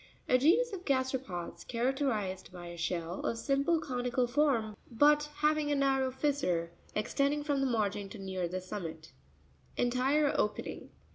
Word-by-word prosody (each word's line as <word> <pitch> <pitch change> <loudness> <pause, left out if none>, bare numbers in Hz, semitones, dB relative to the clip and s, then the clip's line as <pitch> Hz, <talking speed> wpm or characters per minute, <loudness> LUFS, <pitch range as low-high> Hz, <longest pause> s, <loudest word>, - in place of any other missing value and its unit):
A 255 - +4
genus 415 - +4
of 370 -2 -5
gasteropods, 260 - -2
character 265 +3 0
ized 190 -5 -3
by 175 -1 -9
a 170 - -7
shell 170 +1 -2
of 230 - -1
simple 280 +6 +2
conical 250 -3 0
form, 240 -5 +1
but 295 +4 +4
having 300 -1 +2
a - - +3
narrow 270 -1 +2
fissure, 260 - 0 0.2
extending 280 +7 +1
from 290 -2 0
the 270 - +2
margin 205 -4 -1
to 225 - -9
near 190 -2 -3
the 185 +2 -4
summit 165 -4 -6 0.7
(page - - +3
61). 255 +1 +1
ENTIRE 295 +1 +3
opeNinc. 210 - -2
255 Hz, 160 wpm, -32 LUFS, 195-285 Hz, 0.7 s, A